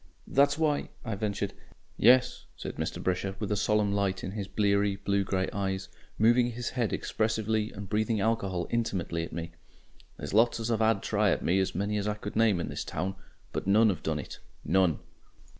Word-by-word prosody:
"That's 140 +1 +3
why 155 -2 +1
" - - -22
I 115 - -2
ventured. 100 -1 -2 0.4
"Yes," 125 +3 +4
said - - -6
Mr. - - -3
Brisher, 95 +1 -1
with 105 0 -4
a - - +2
solemn 105 0 +2
light 100 -2 0
in 95 - -4
his 100 -1 -4
bleary, 100 0 +2
blue 100 0 0
grey 95 -1 -1
eyes, 95 -1 -2 0.3
moving 120 +2 +4
his 120 +1 -3
head 120 -4 -1
expressively 110 0 -1
and 100 -1 -8
breathing 110 +2 0
alcohol 100 -5 0
INTIMATELY 95 -8 -1
at - - -11
me. 85 +1 -5 0.7
"There's 75 - -6
lots 115 +2 +4
as 115 +1 -2
'ave 110 -1 +2
'ad 110 -1 +4
a - - -13
try 105 -1 +2
at - - 0
me 95 +2 +3
many 100 +3 -1
as 100 - -2
I 105 - 0
could 105 0 -7
name 110 -4 +3
in 85 - -3
this - - -4
town 95 +1 -3 0.4
but - - -3
none 105 +2 +5
'ave 90 - -5
done 80 -1 -1
it 75 - -7 0.3
none." 90 -3 +3
100 Hz, 200 wpm, -29 LUFS, 95-110 Hz, 0.7 s, none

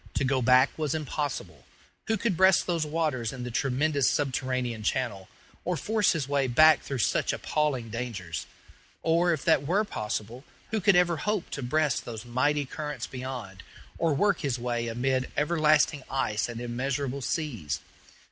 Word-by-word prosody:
To - - +1
go 135 -1 +1
back 130 +2 +5
was 155 -1 0
impossible. 135 - -4 0.4
Who 220 - +1
could 205 -2 0
breast 190 +1 +5
those 165 -3 -1
waters 150 -8 -1
in 125 -2 -7
the 125 - -5
tremendous 140 +3 +1
subterranean 130 -4 -1
channel, 105 -4 -2 0.3
or 180 -1 -1
force 210 +6 +2
his 155 -6 -2
way 140 -1 +1
back 155 +5 +6
through 135 - -4
such 115 - +1
appalling 135 -7 -1
dangers? 105 -9 -5 0.6
Or, 170 +2 +3
if 155 -5 -2
that 140 0 +3
were 195 +6 +2
possible, 110 - -4 0.3
who 220 -1 0
could 200 0 +5
ever 175 -2 +3
hope 210 +1 -2
to 140 - -4
breast 145 +2 +1
those 115 -1 -7
mighty 145 +4 +1
currents 150 +2 -5
beyond, 125 -7 -7 0.4
or 165 -3 +2
work 205 +8 +2
his 135 -4 -1
way 120 -1 -2
amid 130 +3 0
everlasting 150 -2 +3
ice 110 -5 -1
and 120 -1 -6
immeasurable 130 +3 -2
seas? 125 - -2
135 Hz, 160 wpm, -28 LUFS, 120-155 Hz, 0.6 s, back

